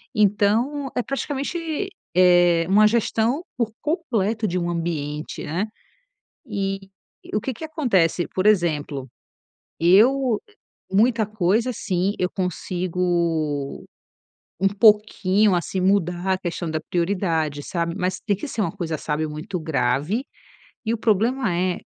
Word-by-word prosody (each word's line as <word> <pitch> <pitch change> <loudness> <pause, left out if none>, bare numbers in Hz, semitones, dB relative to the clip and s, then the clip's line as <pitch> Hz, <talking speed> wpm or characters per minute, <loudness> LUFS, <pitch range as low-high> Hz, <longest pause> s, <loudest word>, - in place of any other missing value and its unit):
então 215 +7 +2
é 245 - 0
praticamente, 310 +6 -3 0.3
eh, 175 -2 +5
uma 210 +2 +6
gestão 235 - +1
por 230 -3 0
completo 230 - 0
de 180 -1 -1
um 175 - -2
ambiente, 155 -3 -3
né. 180 +8 -2 0.8
E 195 -4 -2 0.6
o 210 - +1
que 265 - -3
que 320 - -7
acontece, 195 - +1
por 190 +2 0
exemplo. 150 -9 +1 0.7
Eu 225 +7 +4 0.5
muita 225 +3 +3
coisa, 215 +4 +1
assim, 195 -4 -1
eu 180 0 0
consigo 175 -5 -1 0.8
um 195 - +3
pouquinho, 210 -1 +4
assim, 175 +2 -2
mudar 185 -1 +1
a - - 0
questão 175 -2 -4
da 155 - -1
prioridade, 170 -5 -1
sabe, 170 +1 -2
mas 185 -1 -1
tem 205 - 0
que 205 - -6
ser 230 - -3
uma 180 -5 0
coisa, 170 -5 -3
sabe, 150 +1 -2
muito 170 +5 -5
grave. 155 - 0 0.6
E 225 - 0
o - - -4
problema 225 0 +1
é 180 +1 0
190 Hz, 130 wpm, -23 LUFS, 170-220 Hz, 0.8 s, uma